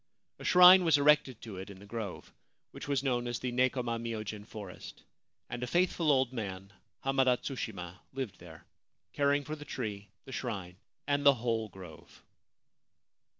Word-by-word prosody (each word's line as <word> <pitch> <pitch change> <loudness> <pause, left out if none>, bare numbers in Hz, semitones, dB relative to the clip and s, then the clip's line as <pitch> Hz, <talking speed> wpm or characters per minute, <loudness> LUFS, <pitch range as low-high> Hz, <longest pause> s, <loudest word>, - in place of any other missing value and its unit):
A - - -9
shrine 180 +1 +8
was 165 -3 +5
erected 145 -4 +3
to 105 -5 -8
it 95 +2 -7
in 100 - -10
the 100 - -13
grove, 105 -3 -6 0.4
which - - -9
was 140 -2 0
known 120 -3 0
as 120 -1 -2
the 125 0 -3
Nekoma 125 -2 0
myojin 110 -2 -5
forest; 100 -5 -10 0.4
and 125 - -6
a 125 - -2
faithful 170 0 +2
old 130 -2 +2
man, 100 -4 -6 0.3
Hamada 135 -2 +3
Tsushima, 100 -10 -6
lived 130 -6 -5
there, 80 -2 -13 0.5
caring 145 0 +2
for 155 +2 -5
the 150 - -10
tree, 105 -8 -5 0.2
the - - -10
shrine, 100 -9 -5 0.3
and 145 0 0
the 140 -1 +7
whole 115 -2 -1
grove. 90 -5 -13
120 Hz, 160 wpm, -31 LUFS, 100-140 Hz, 0.5 s, shrine